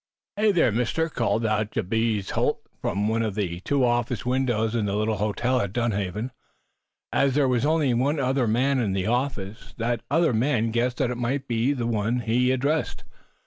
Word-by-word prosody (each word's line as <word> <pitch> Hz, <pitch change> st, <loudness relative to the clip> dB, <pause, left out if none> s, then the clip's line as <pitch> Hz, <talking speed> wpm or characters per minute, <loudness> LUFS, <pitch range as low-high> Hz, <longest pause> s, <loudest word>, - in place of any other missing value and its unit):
"Hey, 210 Hz, +1 st, +3 dB
there, 170 Hz, -, +3 dB
Mister!" 125 Hz, +9 st, 0 dB
called 115 Hz, -4 st, 0 dB
out 110 Hz, -1 st, 0 dB
Jabez 110 Hz, 0 st, -1 dB
Holt, -, -, 0 dB, 0.2 s
from 100 Hz, +1 st, -1 dB
one 110 Hz, +1 st, +1 dB
of 110 Hz, -3 st, -2 dB
the 90 Hz, -5 st, -2 dB
two 135 Hz, +6 st, +1 dB
office 120 Hz, -2 st, 0 dB
windows 120 Hz, -3 st, 0 dB
in 110 Hz, -3 st, 0 dB
the 100 Hz, -, -1 dB
little 110 Hz, +1 st, 0 dB
hotel 120 Hz, +5 st, 0 dB
at 100 Hz, -1 st, -3 dB
Dunhaven. 110 Hz, -1 st, -2 dB, 0.8 s
As 135 Hz, -1 st, +2 dB
there 145 Hz, -2 st, +3 dB
was 125 Hz, +2 st, +1 dB
only 155 Hz, -5 st, +2 dB
one 140 Hz, +6 st, +1 dB
other 130 Hz, -2 st, +1 dB
man 130 Hz, +5 st, +2 dB
in 105 Hz, -6 st, 0 dB
the 95 Hz, -1 st, -1 dB
office, 115 Hz, -4 st, -3 dB
that 120 Hz, -1 st, -1 dB
other 160 Hz, 0 st, +3 dB
man 115 Hz, -1 st, +1 dB
guessed 120 Hz, +2 st, 0 dB
that -, -, +1 dB
he -, -, -2 dB
might 130 Hz, +3 st, -2 dB
be 120 Hz, +3 st, +1 dB
the 125 Hz, -5 st, -2 dB
one 115 Hz, +2 st, 0 dB
addressed. 125 Hz, +6 st, 0 dB
120 Hz, 185 wpm, -25 LUFS, 110-130 Hz, 0.8 s, Hey